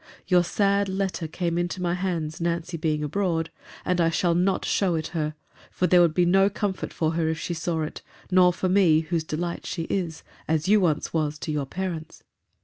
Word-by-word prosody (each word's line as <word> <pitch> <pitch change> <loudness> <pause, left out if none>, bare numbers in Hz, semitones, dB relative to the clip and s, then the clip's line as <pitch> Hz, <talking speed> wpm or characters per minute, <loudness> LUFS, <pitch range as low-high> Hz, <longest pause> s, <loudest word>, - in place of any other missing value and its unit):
Your 180 -1 +4
sad 200 +2 +1
letter 190 -3 -2
came 170 +1 -2
into 175 +1 -2
my 175 -1 0
hands, 170 -4 -3
Nancy 170 0 -2
being 155 -2 -1
abroad: 165 0 -1 0.3
and 180 -1 +1
I 165 - +3
shall 170 +1 +1
not 185 +2 +1
show 185 -4 +1
it 160 -1 -3
her: 155 -2 -2 0.3
for 180 - -1
there 180 -1 +5
would 165 -3 +3
be 180 - +4
no 195 +3 +4
comfort 200 -1 -3
for 160 -1 0
her, 165 -1 0
if 160 - -1
she 175 - -3
saw 165 -1 -2
it, 155 - -6 0.3
nor 180 -1 +6
for 185 +1 -2
me, 180 -5 +4
whose 165 0 -2
delight 170 +2 -4
she 165 - -3
is—as 160 -2 -3
you 210 +1 +5
once 155 -4 0
was 155 -2 0
to 155 - -4
your 145 -3 -2
parents. 170 -1 -5
170 Hz, 200 wpm, -25 LUFS, 160-185 Hz, 0.3 s, nor